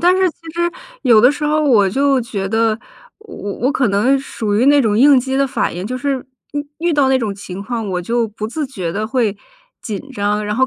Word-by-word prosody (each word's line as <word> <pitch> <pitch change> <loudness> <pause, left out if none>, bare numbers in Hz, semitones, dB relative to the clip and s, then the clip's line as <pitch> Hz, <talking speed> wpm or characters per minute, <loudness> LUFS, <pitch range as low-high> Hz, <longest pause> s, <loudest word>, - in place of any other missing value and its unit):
但 355 +2 +4
是 375 -1 +3
其 - - -26 0.2
实 345 0 0 0.3
有 235 -5 +6
的 250 +4 +6
时 300 - -4
候 305 +1 +2
我 215 -8 +4
就 275 +4 +2
觉 200 -4 -4
得， 225 0 +1 0.4
我 435 -1 -13
我 200 -1 -5
我 285 - +2
可 255 -7 +1
能 230 +8 +2
属 220 -6 -3
于 245 +5 +3
那 285 0 +6
种 215 -1 +1
应 275 0 +7
激 265 +1 -2
的 275 0 +2
反 260 - -1
应， 180 +3 -4
就 255 +2 -3
是 275 0 -1 0.3
遇 290 0 -3
遇 340 0 0
到 280 -3 +3
那 265 -1 +3
种 210 -4 -2
情 195 0 -8
况， 230 -1 -4
我 180 -1 -2
就 235 +4 0
不 215 +1 -5
自 290 +5 -3
觉 185 -10 -4
地 215 +2 -2
会 230 -4 0 0.5
紧 225 +6 -6
张， 210 -2 -1
然 210 0 -2
后 260 +2 +2
240 Hz, 260 characters per minute, -18 LUFS, 210-275 Hz, 0.5 s, 应